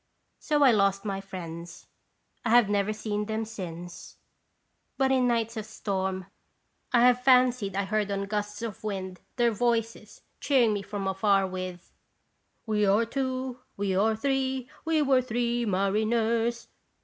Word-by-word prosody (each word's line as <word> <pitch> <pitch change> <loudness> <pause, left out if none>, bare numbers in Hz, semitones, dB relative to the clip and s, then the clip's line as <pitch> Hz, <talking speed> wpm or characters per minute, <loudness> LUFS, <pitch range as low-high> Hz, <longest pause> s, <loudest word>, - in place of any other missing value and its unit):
So 295 -1 +2
I 265 - +7
lost 200 -1 +2
my 195 -1 -2
friends. 170 -3 -8 0.6
I 230 - -1
have 240 -1 +6
never 205 0 +1
seen 210 -1 -3
them 220 0 -2
since; 175 -5 -8 0.8
but 265 -1 +2
in 255 -2 +3
nights 230 -1 0
of 215 - -4
storm 190 -3 -3 0.7
I 240 - +4
have 250 0 +4
fancied 250 -6 +4
I 200 - +1
heard 210 +1 -1
on 200 0 -1
gusts 210 +1 -3
of 220 -3 -6
wind 190 -3 -4 0.2
their 240 -2 +3
voices 230 0 -2 0.2
cheering 245 -6 +3
me 205 - -2
from 200 0 -4
afar 195 0 +2
with: 185 -1 -6 0.4
" - - -47
We 210 -2 +1
were 205 +4 +4
two, 260 0 -3 0.2
we 195 -1 0
were 220 +3 +3
three, 265 +1 -1 0.2
We 320 -2 +2
were 265 -2 +4
three 240 -1 -1
mariners." 225 +4 +1
215 Hz, 150 wpm, -27 LUFS, 195-240 Hz, 0.8 s, I